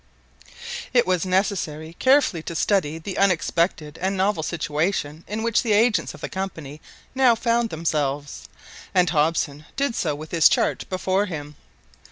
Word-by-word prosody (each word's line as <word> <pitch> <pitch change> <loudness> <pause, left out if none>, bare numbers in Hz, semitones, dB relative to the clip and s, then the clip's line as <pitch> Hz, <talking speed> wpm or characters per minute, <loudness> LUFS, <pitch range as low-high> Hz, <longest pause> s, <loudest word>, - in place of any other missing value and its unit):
It 245 - +5
was 185 0 0
necessary 175 -5 -1
carefully 260 - +3
to 170 - -6
study 165 -4 +1
the 180 +4 -5
unexpected 170 -4 +1
and 190 +2 -1
novel 190 -2 +1
situation 160 0 -2
in 215 +2 -3
which 230 -1 +2
the 225 -3 +1
agents 220 +2 +2
of - - -15
the - - -3 0.2
Company 155 -6 -8 0.3
now 260 -3 +4
found 235 0 +1
themselves, 145 -4 -2 0.5
and 180 -3 +4
Hobson 150 -2 0
did 280 -2 0
so 155 -9 -1
with 155 +1 -9
his 165 -2 +6
chart - - 0
before 190 +2 0
him. 150 -4 -7
175 Hz, 150 wpm, -23 LUFS, 155-205 Hz, 0.5 s, his